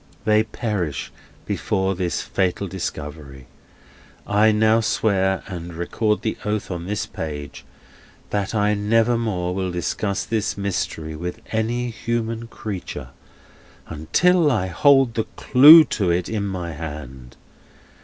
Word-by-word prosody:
They 110 Hz, 0 st, +4 dB
perish 105 Hz, -, -3 dB, 0.3 s
before 95 Hz, 0 st, -1 dB
this 90 Hz, -4 st, -2 dB
fatal 95 Hz, +1 st, -1 dB
discovery. 75 Hz, -6 st, -6 dB, 0.8 s
I 105 Hz, +2 st, +4 dB
now 110 Hz, +1 st, +3 dB
swear, 95 Hz, -4 st, +1 dB
and 85 Hz, -2 st, -7 dB
record 105 Hz, +5 st, -1 dB
the 110 Hz, -, -2 dB
oath 105 Hz, -1 st, -2 dB
on 85 Hz, 0 st, -5 dB
this 105 Hz, 0 st, -2 dB
page, 75 Hz, -3 st, -7 dB, 0.7 s
That 100 Hz, +1 st, -2 dB
I 105 Hz, 0 st, +2 dB
nevermore 110 Hz, -3 st, +1 dB
will 95 Hz, 0 st, -2 dB
discuss 95 Hz, +3 st, -2 dB
this 110 Hz, -2 st, -2 dB
mystery 85 Hz, -5 st, -3 dB
with 90 Hz, +3 st, -5 dB
any 120 Hz, +2 st, -1 dB
human 115 Hz, 0 st, -3 dB
creature 105 Hz, -5 st, -6 dB, 0.8 s
until 160 Hz, -, +2 dB
I 110 Hz, -9 st, +1 dB
hold 135 Hz, +5 st, +4 dB
the 110 Hz, -, -1 dB
clue 150 Hz, +5 st, +9 dB, 0.2 s
to 95 Hz, -4 st, +2 dB
it 85 Hz, +1 st, 0 dB
in 105 Hz, -2 st, -2 dB
my 90 Hz, -3 st, -4 dB
hand. 70 Hz, -5 st, -8 dB
100 Hz, 125 wpm, -22 LUFS, 85-110 Hz, 0.8 s, clue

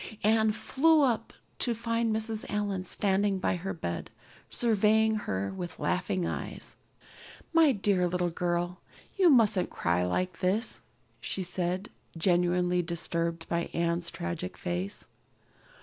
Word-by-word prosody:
Anne 220 Hz, 0 st, +4 dB
flew 300 Hz, +7 st, +3 dB
up, 230 Hz, -4 st, +1 dB, 0.3 s
to 240 Hz, -2 st, +2 dB
find 230 Hz, 0 st, 0 dB
Mrs. 220 Hz, 0 st, -1 dB
Allan 205 Hz, -3 st, -2 dB
standing 195 Hz, +1 st, +1 dB
by 185 Hz, -, 0 dB
her 185 Hz, +2 st, -4 dB
bed, 85 Hz, -, -4 dB, 0.4 s
surveying 220 Hz, -1 st, +3 dB
her 100 Hz, -, -2 dB
with 175 Hz, -3 st, -6 dB
laughing 180 Hz, 0 st, -1 dB
eyes. -, -, -5 dB, 0.8 s
"My 325 Hz, -3 st, +6 dB
dear 195 Hz, -5 st, +1 dB
little 175 Hz, 0 st, 0 dB
girl, 175 Hz, +1 st, -1 dB, 0.4 s
you 375 Hz, -3 st, +5 dB
mustn't 220 Hz, -, +4 dB
cry 85 Hz, +1 st, 0 dB
like 170 Hz, -, -1 dB
this," 205 Hz, +6 st, 0 dB, 0.4 s
she 190 Hz, +10 st, -3 dB
said, 180 Hz, +2 st, -2 dB, 0.3 s
genuinely 180 Hz, +1 st, +2 dB
disturbed 170 Hz, -1 st, -2 dB
by 170 Hz, 0 st, -1 dB
Anne's 170 Hz, 0 st, 0 dB
tragic 85 Hz, -, -4 dB
face. 90 Hz, +3 st, -3 dB
185 Hz, 125 wpm, -29 LUFS, 170-220 Hz, 0.8 s, My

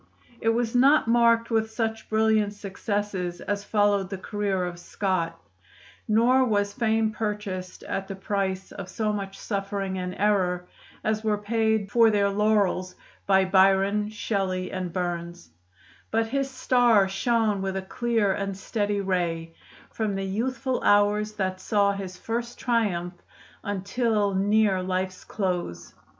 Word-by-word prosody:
It 225 Hz, -, +1 dB
was 230 Hz, 0 st, 0 dB
not 270 Hz, +2 st, +5 dB
marked 230 Hz, 0 st, +3 dB
with 220 Hz, -1 st, +1 dB
such 225 Hz, 0 st, -3 dB
brilliant 220 Hz, -1 st, +2 dB
successes 200 Hz, -3 st, -3 dB
as 200 Hz, 0 st, -3 dB
followed 205 Hz, -2 st, +2 dB
the 195 Hz, -, -4 dB
career 195 Hz, -1 st, -2 dB
of 175 Hz, -1 st, -6 dB
Scott; 175 Hz, -3 st, -2 dB, 0.7 s
nor 240 Hz, +5 st, +4 dB
was 205 Hz, -4 st, +1 dB
fame 225 Hz, -3 st, +1 dB
purchased 210 Hz, -4 st, -4 dB
at 195 Hz, 0 st, -4 dB
the 195 Hz, -, -5 dB
price 190 Hz, -1 st, -2 dB
of 190 Hz, -2 st, -8 dB
so 215 Hz, -2 st, -1 dB
much 195 Hz, -1 st, -5 dB
suffering 195 Hz, -2 st, -3 dB
and 180 Hz, 0 st, -4 dB
error 185 Hz, -4 st, +1 dB, 0.4 s
as 215 Hz, 0 st, 0 dB
were 215 Hz, -1 st, +1 dB
paid 220 Hz, -1 st, 0 dB
for 230 Hz, -1 st, +6 dB
their 200 Hz, -2 st, +2 dB
laurels 200 Hz, -3 st, +1 dB, 0.3 s
by 190 Hz, -1 st, +4 dB
Byron, 195 Hz, +2 st, +3 dB
Shelley, 195 Hz, -4 st, -2 dB
and 185 Hz, -2 st, -3 dB
Burns; 170 Hz, -, -4 dB, 0.6 s
but 225 Hz, +1 st, +1 dB
his 275 Hz, +4 st, -1 dB
star 245 Hz, -6 st, +3 dB
shone 215 Hz, +1 st, +1 dB
with 195 Hz, 0 st, -2 dB
a 190 Hz, -, -3 dB
clear 225 Hz, 0 st, 0 dB
and 195 Hz, -1 st, -3 dB
steady 205 Hz, 0 st, -1 dB
ray, 170 Hz, -4 st, -1 dB, 0.4 s
from 215 Hz, -3 st, -2 dB
the 195 Hz, 0 st, -2 dB
youthful 255 Hz, +6 st, -2 dB
hours 205 Hz, +1 st, +3 dB
that 185 Hz, -2 st, -2 dB
saw 200 Hz, -1 st, +2 dB
his 190 Hz, -2 st, -6 dB
first 235 Hz, +1 st, -4 dB
triumph 200 Hz, -8 st, 0 dB, 0.5 s
until 205 Hz, +1 st, 0 dB
near 200 Hz, 0 st, +2 dB
life's 185 Hz, 0 st, -3 dB
close. 180 Hz, -, -3 dB
205 Hz, 140 wpm, -26 LUFS, 190-220 Hz, 0.7 s, for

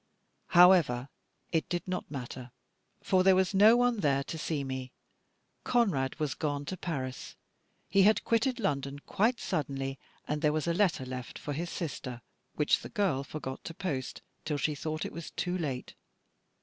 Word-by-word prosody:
However, 165 Hz, -9 st, +6 dB, 0.4 s
it 160 Hz, -2 st, 0 dB
did 175 Hz, +1 st, -2 dB
not 185 Hz, 0 st, -3 dB
matter; 125 Hz, -2 st, -6 dB, 0.5 s
for 185 Hz, -, +3 dB
there 190 Hz, 0 st, +6 dB
was 185 Hz, 0 st, +2 dB
no 215 Hz, +4 st, +7 dB
one 245 Hz, -1 st, +3 dB
there 140 Hz, -5 st, +2 dB
to 160 Hz, -, -6 dB
see 150 Hz, -2 st, -2 dB
me. 130 Hz, -1 st, -5 dB, 0.7 s
Conrad 180 Hz, -, +1 dB
was 150 Hz, -3 st, 0 dB
gone 145 Hz, -2 st, -2 dB
to 185 Hz, -, -4 dB
Paris; 135 Hz, -8 st, -5 dB, 0.5 s
he 195 Hz, +3 st, +4 dB
had 215 Hz, +3 st, +5 dB
quitted 245 Hz, +2 st, +1 dB
London 140 Hz, -, -1 dB
quite 230 Hz, +4 st, +1 dB
suddenly, 135 Hz, -5 st, -2 dB, 0.3 s
and 150 Hz, 0 st, -1 dB
there 150 Hz, -2 st, +3 dB
was 155 Hz, -1 st, -1 dB
a 170 Hz, -, +1 dB
letter 175 Hz, -7 st, +2 dB
left 125 Hz, -1 st, -6 dB
for 145 Hz, -, -5 dB
his 170 Hz, +4 st, -3 dB
sister, 125 Hz, -8 st, -5 dB, 0.3 s
which 150 Hz, -, +3 dB
the -, -, -9 dB
girl 190 Hz, -, 0 dB
forgot 135 Hz, -2 st, -6 dB
to 165 Hz, -, -6 dB
post, 135 Hz, -10 st, -4 dB, 0.2 s
till 150 Hz, -2 st, -1 dB
she 150 Hz, +2 st, 0 dB
thought 155 Hz, +1 st, -3 dB
it -, -, -6 dB
was 170 Hz, -1 st, -6 dB
too 180 Hz, 0 st, -2 dB
late. 140 Hz, -8 st, -3 dB
155 Hz, 170 wpm, -30 LUFS, 135-185 Hz, 0.7 s, no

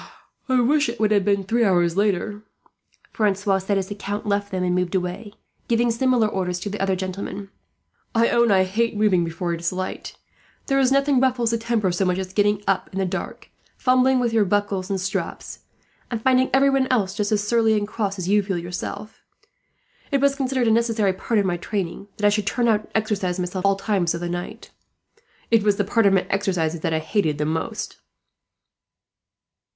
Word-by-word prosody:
"I 255 Hz, -1 st, +3 dB
would 275 Hz, +6 st, +3 dB
that 235 Hz, -5 st, -1 dB
it 215 Hz, -1 st, +2 dB
had 205 Hz, -2 st, +3 dB
been 200 Hz, 0 st, +1 dB
three 235 Hz, +5 st, +1 dB
hours 175 Hz, -4 st, +2 dB
later," 205 Hz, +1 st, 0 dB, 0.7 s
Francois 200 Hz, -2 st, +1 dB
said, 195 Hz, +1 st, -1 dB
as 190 Hz, -1 st, -2 dB
the -, -, -3 dB
Count 205 Hz, +1 st, -5 dB
left 200 Hz, -1 st, -1 dB
them 185 Hz, -2 st, -2 dB
and 180 Hz, -1 st, +1 dB
moved 180 Hz, +1 st, -1 dB
away, 185 Hz, +3 st, -3 dB, 0.3 s
giving 235 Hz, 0 st, +2 dB
similar 245 Hz, -1 st, +2 dB
orders 180 Hz, -3 st, -2 dB
to 205 Hz, -, -4 dB
the 210 Hz, -, -5 dB
other 195 Hz, -1 st, +1 dB
gentlemen. 190 Hz, +1 st, -5 dB, 0.7 s
"I 230 Hz, +1 st, +4 dB
own 235 Hz, -1 st, +3 dB
I 190 Hz, -2 st, +4 dB
hate 215 Hz, +4 st, -1 dB
moving 200 Hz, -5 st, +3 dB
before 170 Hz, +1 st, -3 dB
it 165 Hz, -, -4 dB
is 170 Hz, 0 st, -1 dB
light. 185 Hz, 0 st, -5 dB, 0.5 s
There 275 Hz, 0 st, +1 dB
is 265 Hz, -1 st, +3 dB
nothing 275 Hz, -1 st, +3 dB
ruffles 250 Hz, -3 st, +1 dB
the 230 Hz, -, 0 dB
temper 225 Hz, -5 st, 0 dB
so 180 Hz, +3 st, 0 dB
much 180 Hz, -1 st, +1 dB
as 190 Hz, 0 st, -5 dB
getting 205 Hz, 0 st, +1 dB
up 190 Hz, -1 st, 0 dB
in 190 Hz, -, -7 dB
the 190 Hz, -, +1 dB
dark, 180 Hz, -, -6 dB, 0.3 s
fumbling 255 Hz, 0 st, +3 dB
with 240 Hz, -2 st, 0 dB
your 220 Hz, -2 st, +4 dB
buckles 200 Hz, -1 st, -1 dB
and 195 Hz, -1 st, -1 dB
straps, 195 Hz, +1 st, -4 dB, 0.5 s
and 235 Hz, -, -3 dB
finding 260 Hz, +2 st, +3 dB
everyone 270 Hz, 0 st, +3 dB
else 205 Hz, -8 st, +1 dB
just 210 Hz, 0 st, -2 dB
as 210 Hz, -1 st, 0 dB
surly 225 Hz, -2 st, +3 dB
and 205 Hz, 0 st, -2 dB
cross 205 Hz, -2 st, -3 dB
as 180 Hz, -1 st, -4 dB
you 205 Hz, +2 st, +4 dB
feel 190 Hz, -2 st, -3 dB
yourself. 175 Hz, +5 st, -6 dB, 0.9 s
It 280 Hz, -, +1 dB
was 280 Hz, 0 st, +3 dB
considered 260 Hz, -3 st, -1 dB
a -, -, +4 dB
necessary 225 Hz, -3 st, +2 dB
part 215 Hz, +3 st, -1 dB
of 200 Hz, -, +1 dB
my 175 Hz, -2 st, 0 dB
training 195 Hz, +1 st, -4 dB
that 205 Hz, -, -1 dB
I -, -, +7 dB
should 205 Hz, -1 st, -1 dB
turn 240 Hz, +1 st, +1 dB
out 215 Hz, -2 st, +1 dB
and 220 Hz, -, +3 dB, 0.2 s
arm 180 Hz, -1 st, 0 dB
myself 180 Hz, 0 st, -3 dB
at 195 Hz, -, +4 dB
all 195 Hz, -, +2 dB
times 195 Hz, -4 st, 0 dB
of -, -, -4 dB
the 175 Hz, -, -3 dB
night. 175 Hz, 0 st, -6 dB, 0.8 s
It 230 Hz, -1 st, +5 dB
was 205 Hz, 0 st, +2 dB
the 205 Hz, -, 0 dB
part 220 Hz, +2 st, +2 dB
of 195 Hz, -, +4 dB
my 190 Hz, -, +2 dB
exercises 180 Hz, -5 st, 0 dB
that 160 Hz, -, -2 dB
I 160 Hz, -, +1 dB
hated 155 Hz, -1 st, 0 dB
the 150 Hz, -, -1 dB
most." 160 Hz, +1 st, -3 dB
205 Hz, 210 wpm, -23 LUFS, 185-230 Hz, 0.9 s, I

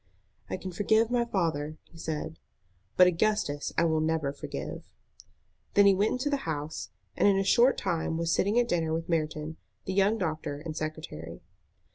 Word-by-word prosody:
"I -, -, -2 dB
can 185 Hz, 0 st, -6 dB
forgive 220 Hz, +5 st, +2 dB
my 240 Hz, -1 st, +2 dB
father," 160 Hz, -8 st, -1 dB
he 165 Hz, -, -17 dB
said, 160 Hz, 0 st, -4 dB, 0.6 s
"but 180 Hz, -, +9 dB
Augustus 180 Hz, -5 st, +1 dB
I 170 Hz, -, +4 dB
will 160 Hz, -1 st, +2 dB
never 155 Hz, -3 st, 0 dB
forgive." -, -, -6 dB, 0.9 s
Then 205 Hz, -, +7 dB
he 200 Hz, -, +7 dB
went 200 Hz, +3 st, +2 dB
into 260 Hz, +4 st, -1 dB
the 285 Hz, -, +2 dB
house, 150 Hz, 0 st, -4 dB, 0.3 s
and -, -, +3 dB
in 200 Hz, -1 st, +4 dB
a 195 Hz, -, +2 dB
short 240 Hz, +7 st, +4 dB
time 165 Hz, -3 st, -1 dB
was 165 Hz, 0 st, 0 dB
sitting 205 Hz, +4 st, +2 dB
at 245 Hz, -1 st, +3 dB
dinner 160 Hz, -5 st, 0 dB
with 165 Hz, 0 st, -4 dB
Merton, 155 Hz, -1 st, -1 dB, 0.3 s
the 190 Hz, -, -2 dB
young 200 Hz, +3 st, +3 dB
doctor 155 Hz, -6 st, -3 dB
and 155 Hz, +1 st, -6 dB
secretary. 155 Hz, -, -6 dB
165 Hz, 175 wpm, -29 LUFS, 155-200 Hz, 0.9 s, but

